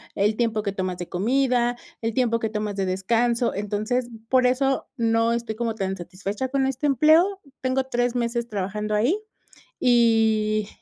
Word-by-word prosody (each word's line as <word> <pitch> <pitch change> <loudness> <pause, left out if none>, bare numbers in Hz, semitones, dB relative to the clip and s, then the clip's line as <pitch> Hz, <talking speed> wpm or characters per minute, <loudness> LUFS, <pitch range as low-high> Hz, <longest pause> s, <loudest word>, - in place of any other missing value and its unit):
el 210 +2 +1
tiempo 225 -3 0
que 200 - -1
tomas 185 -2 -3
de 175 - -7
comida, 245 +4 +1 0.3
el 225 0 -1
tiempo 230 -1 +1
que 220 -1 -2
tomas 210 -1 -3
de 195 -1 -1
descanso. 230 +6 +1
Entonces, 210 +5 -2 0.2
por 255 -1 +4
eso 270 +1 +1
no 230 -1 +2
estoy 235 -2 -3
como 230 0 -2
tan 195 -2 -2
satisfecha 195 +7 -4
con 270 0 0
este 265 +2 -2
empleo. 320 - +4 0.2
Tengo 260 +1 +1
3 245 -1 -1
meses 235 0 -1
trabajando 210 +1 -3
ahí, 250 - +2 0.6
y, 220 -3 +3
230 Hz, 160 wpm, -24 LUFS, 210-250 Hz, 0.6 s, por